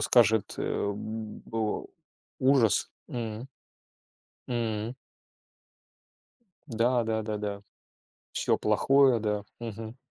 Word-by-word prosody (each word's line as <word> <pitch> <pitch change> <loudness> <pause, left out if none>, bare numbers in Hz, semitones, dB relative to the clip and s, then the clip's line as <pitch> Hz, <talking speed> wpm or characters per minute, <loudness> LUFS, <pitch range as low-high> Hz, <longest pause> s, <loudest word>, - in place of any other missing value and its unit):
скажет 110 -4 +4
э, 100 - 0
б 110 +1 -6
о: 110 -1 -1 0.5
"Ужас!" 130 -5 +4 0.2
М. 115 0 -4 1.0
Мм. 115 -1 -1 1.7
Да 120 0 +2
да 110 0 0
да 110 0 -2
да, 100 -1 -4 0.7
всё - - +2
плохое, 135 -3 +4
да. 105 -1 -1 0.2
Мгм. 115 0 -6
110 Hz, 90 wpm, -29 LUFS, 105-120 Hz, 1.7 s, скажет